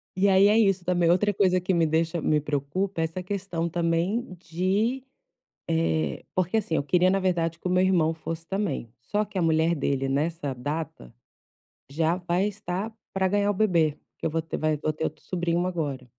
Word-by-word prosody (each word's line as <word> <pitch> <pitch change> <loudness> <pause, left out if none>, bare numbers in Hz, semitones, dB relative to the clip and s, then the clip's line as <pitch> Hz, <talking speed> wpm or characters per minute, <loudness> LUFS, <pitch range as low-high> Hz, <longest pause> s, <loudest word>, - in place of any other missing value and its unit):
E 195 +1 +3
aí 195 +1 +6
é 210 - +4
isso, 195 -5 +2
também, 175 -2 +2
outra 205 +4 +3
coisa 185 -2 +3
que 185 +1 -1
me 165 -2 +3
deixa 160 +1 0
me 150 0 +2
preocupa, 150 +6 -2
é - - +2
essa 165 +3 -3
questão 180 -3 -3
também 175 +6 -1
de 195 +10 0 0.7
eh, 80 - 0
porque, 185 +4 +1
assim, 195 -7 -1
eu - - +1
queria 180 +5 +3
na 195 0 +2
verdade 170 -3 0
que 180 - -4
o - - -1
meu 180 0 +3
irmão 165 -4 +2
fosse 165 0 -6
também, 190 - -2
só 210 - -2
que - - -13
a 185 - +1
mulher 160 +1 +3
dele 135 -3 -1
nessa 145 0 -1
data 140 - -5 0.8
já 160 +4 +1
vai 180 +2 0
estar 210 +1 -4 0.2
para 190 -1 +1
ganhar 205 0 +2
o - - +2
bebê, 170 -7 +2 0.2
que - - -7
eu 165 - +2
vou 165 +1 -1
ter 160 - -5
vai 155 0 +1
vou 150 +1 -1
ter 155 +1 -3
outro 155 - -5
sobrinho 175 -1 -1
agora. 150 -8 -3
170 Hz, 200 wpm, -26 LUFS, 160-190 Hz, 0.8 s, aí